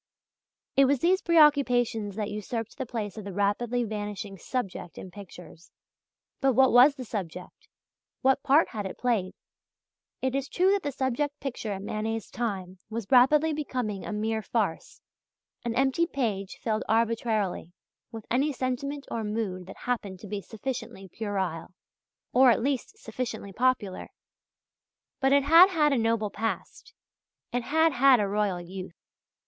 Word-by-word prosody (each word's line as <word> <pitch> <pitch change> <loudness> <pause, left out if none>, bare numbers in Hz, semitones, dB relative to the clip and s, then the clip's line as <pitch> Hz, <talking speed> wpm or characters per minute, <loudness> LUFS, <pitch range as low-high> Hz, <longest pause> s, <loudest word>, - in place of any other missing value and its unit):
It 275 - +6
was 280 +1 +3
these 370 +3 +3
preoccupations 250 - +3
that 210 -1 -3
usurped 220 +2 -4
the 260 - -3
place 215 -4 -4
of - - -8
the 200 - -6
rapidly 225 +5 0
vanishing 205 -2 -5
"subject" 195 - -5
in 185 - -9
pictures. 180 -3 -12 0.7
But 270 -1 +3
what 265 +2 +5
was 255 +4 +7
the 255 - -7
subject? 180 -5 -7 0.6
What 265 +1 +3
part 285 +3 +4
had 205 -3 -4
it - - -8
played? 225 -7 0 0.8
It 260 0 -1
is 275 0 -2
true 370 +2 +3
that 400 0 +2
the 290 - -3
subject 275 +2 -2
picture 245 -5 -4
in 195 +1 -6
Manet's 220 +1 -3
time 190 -6 -4
was 225 -1 -4
rapidly 295 +5 +5
becoming 250 -9 -3
a - - -5
mere 220 +1 -1
farce, 210 -6 -2 0.6
an 235 -1 -2
empty 270 +6 +2
page 210 - -3
filled 220 -2 -1
arbitrarily 220 -5 0 0.4
with 225 -2 -8
any 275 +5 +2
sentiment 275 +2 -3
or 230 - -2
mood 210 -4 -3
that 195 - -10
happened 205 -7 -3
to 210 - -9
be 200 +1 -4
sufficiently 230 -3 -6
puerile, 190 -5 -4 0.6
or 260 0 +7
at 230 -1 +3
least 280 - -2
sufficiently 245 - -5
popular. 235 -5 0 1.1
But 270 -1 +2
it 280 0 +5
had 330 +6 +8
had 300 -6 +2
a - - +2
noble 225 -2 0
past. 225 - -5 0.6
It 245 - +1
had 320 +5 +2
had 265 -1 +6
a 205 - +1
royal 200 -2 0
youth. 180 0 -8
230 Hz, 155 wpm, -27 LUFS, 205-270 Hz, 1.1 s, had